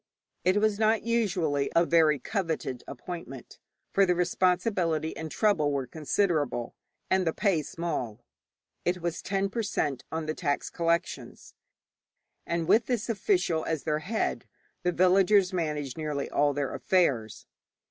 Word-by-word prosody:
It 185 Hz, +2 st, +3 dB
was 210 Hz, 0 st, +2 dB
not 220 Hz, 0 st, +3 dB
usually 180 Hz, -11 st, 0 dB
a 170 Hz, +1 st, +5 dB
very 160 Hz, -3 st, +4 dB
coveted 160 Hz, -, -3 dB
appointment, 135 Hz, -3 st, -8 dB, 0.3 s
for 195 Hz, -, +4 dB
the 180 Hz, -2 st, +3 dB
responsibility 180 Hz, -2 st, +1 dB
and 160 Hz, 0 st, -5 dB
trouble 165 Hz, -7 st, +2 dB
were 140 Hz, -2 st, -1 dB
considerable, 150 Hz, -, -1 dB, 0.4 s
and 185 Hz, -2 st, +2 dB
the 160 Hz, -, +1 dB
pay 195 Hz, -7 st, +1 dB
small. 125 Hz, -8 st, -4 dB, 0.6 s
It 180 Hz, +1 st, 0 dB
was 170 Hz, -1 st, -3 dB
10 195 Hz, +1 st, -1 dB
per 230 Hz, -, -1 dB
cent. 145 Hz, -, -2 dB
on 160 Hz, 0 st, -3 dB
the 155 Hz, -, -2 dB
tax 145 Hz, -2 st, -2 dB
collections. 170 Hz, +1 st, -2 dB, 0.9 s
And 170 Hz, -1 st, -1 dB
with 215 Hz, +4 st, +4 dB
this 240 Hz, -2 st, -1 dB
official 210 Hz, -, +1 dB
as 160 Hz, -3 st, -2 dB
their 155 Hz, -1 st, 0 dB
head, 210 Hz, +8 st, -2 dB, 0.3 s
the 180 Hz, -, +1 dB
villagers 185 Hz, +2 st, +4 dB
managed 150 Hz, -5 st, -2 dB
nearly 150 Hz, -2 st, -3 dB
all 145 Hz, 0 st, +2 dB
their 145 Hz, -2 st, -2 dB
affairs. 135 Hz, -, 0 dB
170 Hz, 140 wpm, -28 LUFS, 150-195 Hz, 0.9 s, a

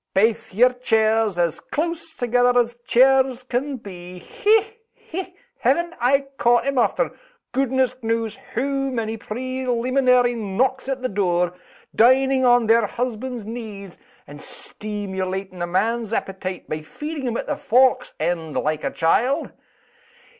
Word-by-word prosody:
Baith 215 Hz, -1 st, +1 dB
yer 250 Hz, +4 st, +5 dB
chairs 220 Hz, -4 st, +2 dB
as 170 Hz, -2 st, +1 dB
close 330 Hz, +1 st, -3 dB
together 245 Hz, 0 st, +2 dB
as 240 Hz, 0 st, +1 dB
chairs 260 Hz, 0 st, +4 dB
can 255 Hz, +2 st, -2 dB
be. 180 Hz, -4 st, -10 dB
Hech! 445 Hz, -, +1 dB, 0.3 s
hech! 365 Hz, +1 st, -5 dB, 0.2 s
haven't 345 Hz, 0 st, +1 dB
I 270 Hz, +3 st, +4 dB, 0.2 s
caught 240 Hz, 0 st, +3 dB
'em, 275 Hz, -2 st, +1 dB
after -, -, +1 dB, 0.4 s
goodness 260 Hz, 0 st, +1 dB
knows 225 Hz, -1 st, -1 dB, 0.2 s
hoo 275 Hz, +2 st, 0 dB
many 225 Hz, -3 st, -2 dB
preleeminary 250 Hz, +2 st, +1 dB
knocks 240 Hz, +5 st, -1 dB
at 260 Hz, -1 st, -3 dB
the -, -, +1 dB
door, 180 Hz, -4 st, 0 dB, 0.4 s
dining 260 Hz, +3 st, +4 dB
on 245 Hz, -1 st, +5 dB
their 225 Hz, -1 st, +4 dB
husbands' 245 Hz, -1 st, -4 dB
knees, 210 Hz, -5 st, -8 dB, 0.3 s
and 145 Hz, +1 st, -11 dB
steemulating 190 Hz, -3 st, -5 dB
a 175 Hz, -, -1 dB
man's 220 Hz, +5 st, 0 dB
appetite 190 Hz, -3 st, -4 dB
by 155 Hz, 0 st, -4 dB
feeding 295 Hz, -, -6 dB
him 235 Hz, -1 st, -1 dB
at -, -, -4 dB
the -, -, -2 dB
fork's 255 Hz, +2 st, +2 dB
end 165 Hz, -3 st, -2 dB
like 155 Hz, 0 st, -1 dB
a -, -, 0 dB
child? 250 Hz, -, +1 dB
240 Hz, 135 wpm, -22 LUFS, 205-260 Hz, 0.4 s, yer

